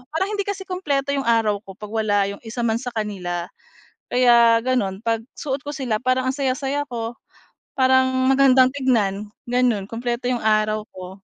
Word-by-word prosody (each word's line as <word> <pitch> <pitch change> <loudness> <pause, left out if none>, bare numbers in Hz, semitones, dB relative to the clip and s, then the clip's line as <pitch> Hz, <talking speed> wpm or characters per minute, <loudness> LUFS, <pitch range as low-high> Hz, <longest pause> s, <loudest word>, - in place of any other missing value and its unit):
parang 380 +5 0
hindi 405 -1 -2
kasi 400 -1 -3
kumpleto 295 -8 -2
'yong 275 -3 -2
araw 225 -3 +2
ko 195 -2 -13
'pag 210 +1 -10
wala 215 -2 +1
'yong 200 - -9
isa 235 +1 -5
man 225 -1 +1
sa 245 -1 -6
kanila. 180 -5 -3 0.6
Kaya 235 -2 +5
gano'n 230 -6 -1
'pag 225 0 -1 0.2
suot 275 -2 -3
ko 290 - -4
sila 260 -7 -2
parang 255 0 +1
ang 260 - 0
saya-saya 275 +1 -1
ko, 230 -1 -4 0.6
parang 260 0 +4 0.2
magandang 265 -1 +5
tignan 220 -7 0 0.2
gano'n 245 -5 +1
kumpleto 235 +3 -4
'yong 245 - -1
araw 215 0 +2
ko. 185 +1 -9
240 Hz, 170 wpm, -22 LUFS, 215-265 Hz, 0.6 s, Kaya